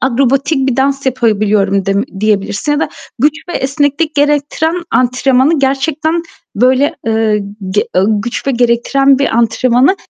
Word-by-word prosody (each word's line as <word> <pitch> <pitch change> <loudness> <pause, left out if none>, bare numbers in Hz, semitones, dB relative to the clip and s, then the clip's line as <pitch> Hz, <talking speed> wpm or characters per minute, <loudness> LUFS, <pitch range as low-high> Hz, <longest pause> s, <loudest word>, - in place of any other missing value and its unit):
akrobatik 270 +2 +1
bir 245 - -1
dans 275 +1 0
yapabiliyorum 210 -5 +1
dem 195 +1 +1 0.2
diyebilirsin 210 +5 0
ya 295 - 0
da - - -1 0.3
güç 290 +5 +3 0.2
ve - - -5
esneklik 285 +3 -1
gerektiren 295 +2 0 0.2
antrenmanı 260 +4 +2
gerçekten, 305 +5 0 0.3
böyle, 260 +7 +2
eee, 220 -1 +1 0.3
g 205 +2 +1
eee, 185 - +3 0.2
güç 240 +3 -5
ve - - +2
gerektiren 250 +3 +2
bir 280 - +1
antrenmanı 245 - +2
265 Hz, 135 wpm, -13 LUFS, 230-285 Hz, 0.3 s, güç